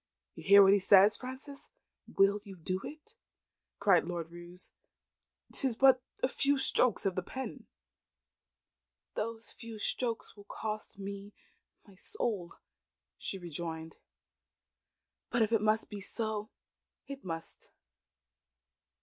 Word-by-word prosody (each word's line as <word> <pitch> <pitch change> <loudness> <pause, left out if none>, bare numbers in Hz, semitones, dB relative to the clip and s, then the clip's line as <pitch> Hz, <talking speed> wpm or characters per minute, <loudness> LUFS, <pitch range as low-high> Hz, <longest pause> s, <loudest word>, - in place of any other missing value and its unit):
"You - - -11
hear 200 +1 +9
what 195 0 +7
he 205 - +5
says, 195 +2 +7
Frances. 260 +2 -9 0.4
You - - -16
will 200 +1 +5
do 185 -2 -5
it?" 310 +9 -10 0.6
cried 195 -4 +4
Lord 170 -2 -4
Roos. 175 +1 -10 0.8
"'Tis 265 -5 +1
but 265 -1 +6 0.2
a - - +5
few 280 +1 +2
strokes 255 -4 +2
of 190 -2 +1
a - - -2
pen." 260 +8 -7 1.5
"Those 225 +1 -4
few 230 -2 -9
strokes 230 +2 -3
will 205 -1 -14
cost 215 -2 -5
me 200 +1 -7 0.5
my 200 - -17
soul," 200 - -3 0.6
she 195 - -4
rejoined. 165 -2 -6 1.3
"But 235 -1 +3
if 220 - 0
it 225 -2 +3
must 215 +1 +2
be 205 -1 -6
so, 215 +1 -2 0.6
it 275 -1 -8
must. 165 -2 -6
205 Hz, 125 wpm, -32 LUFS, 185-235 Hz, 1.5 s, hear